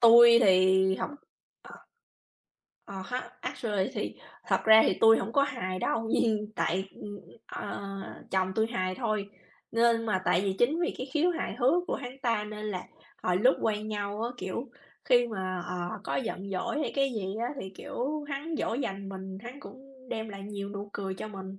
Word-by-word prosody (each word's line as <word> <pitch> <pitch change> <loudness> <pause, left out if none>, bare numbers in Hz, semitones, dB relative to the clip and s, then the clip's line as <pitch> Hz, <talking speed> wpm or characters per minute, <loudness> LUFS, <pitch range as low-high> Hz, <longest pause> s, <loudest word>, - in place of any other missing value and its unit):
Tui 235 0 +9
thì 190 -2 +5
học - - -3 0.5
ờ. - - -13 1.0
Ờ 195 -1 -6
ha, 250 +1 -4
actually 205 -7 -1
thì - - -3 0.3
thật - - +2
ra 220 0 +9
thì - - +1
tui 225 0 +8
hổng 225 - -3
có 280 - +4
hài 235 -10 -2
đâu, 225 +4 0
nhưng 215 -2 +1
tại, 190 +3 0 0.6
ờ, - - -5 0.5
chồng 190 0 +1
tui 220 +1 +2
hài 185 -5 -1
thôi, 215 -3 -2 0.4
nên 230 0 +3
mà 190 -4 +1
tại 175 - +3
vì 195 0 0
chính 300 +8 +3
vì 350 - 0
cái 255 - -3
khiếu 325 +3 +3
hài 340 -1 -2
hước 285 +9 +4
của - - -1
hắn 250 -2 -5
ta 230 -3 +1
nên 210 0 -6
là 185 -4 -3 0.4
hồi 180 -1 +2
lúc 250 +8 +5
quen 215 -1 0
nhau 205 0 -3
á, 235 - -1
kiểu, 235 +7 -4 0.3
khi 245 -1 +5
mà, 185 -5 -3
ờ, 180 - -4 0.3
có - - -1
giận 200 -5 -3
dỗi 195 +9 -1
hay 295 - -1
cái 275 -1 +2
gì 195 -4 -3
á 240 - 0
thì, 190 - -6
kiểu, 295 +4 -3
hắn 290 +3 -3
dỗ 225 - 0
dành 195 -6 -3
mình, 190 0 -7
hắn 250 +4 -8
cũng 265 -1 -14
đem 220 -2 -3
lại 195 -1 -8
nhiều 200 0 -5
nụ 200 0 -6
cười 195 -1 -3
cho 200 - -6
mình, 195 -2 -8
215 Hz, 190 wpm, -29 LUFS, 195-245 Hz, 1.0 s, Tui